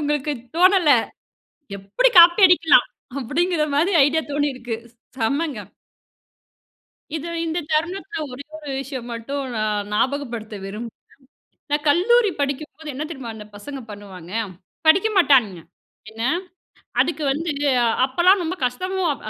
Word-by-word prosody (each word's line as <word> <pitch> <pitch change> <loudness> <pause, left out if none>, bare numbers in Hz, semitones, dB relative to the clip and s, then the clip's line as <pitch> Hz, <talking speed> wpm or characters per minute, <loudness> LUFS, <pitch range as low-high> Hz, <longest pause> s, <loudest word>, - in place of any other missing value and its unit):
உங்களுக்கு 295 0 -1 0.2
தோணல. 370 -2 +4 0.9
எப்புடி 200 - +2
காப்பி 345 +4 +8
அடிக்கலாம்! 335 -3 +5 0.3
அப்படிங்கிற 315 +5 0
மாரி 335 +7 +2
ஐடியா 315 +3 +1
தோணிருக்கு. 260 -5 -2 0.4
செம்மங்க. 275 +3 -1 1.6
இதோ 325 +2 -6 0.2
இந்த 325 +1 -2
தருணத்தில, 370 +6 -2
ஒரே 265 +3 -8
ஒரு 295 -3 -8
விஷயம் 260 -3 -7
மட்டும், 275 +5 -4
நான் 210 -1 -1
நாபகப்படுத்த 240 -4 -2
விரும்புறேன். 215 +3 -8 0.7
நான் 295 +1 0
கல்லூரி 420 +8 +4
படிக்கும்போது 300 +3 -4
என்ன 275 - -4
தெரியுமா 265 -7 -7
அந்த 210 -1 -10
பசங்க 275 +6 -8
பண்ணுவாங்க? 190 -4 -11 0.5
படிக்க 380 +7 +5
மாட்டானுங்க, 245 - +4 0.5
என்ன 225 +1 -7 0.8
அதுக்கு 315 -2 0
வந்து 320 +3 -2 0.5
அப்பலாம் 355 +8 +3
ரொம்ப 345 +2 -3
கஷ்டமோ 370 +10 -3
அப் 280 - -10
290 Hz, 115 wpm, -22 LUFS, 240-340 Hz, 1.6 s, காப்பி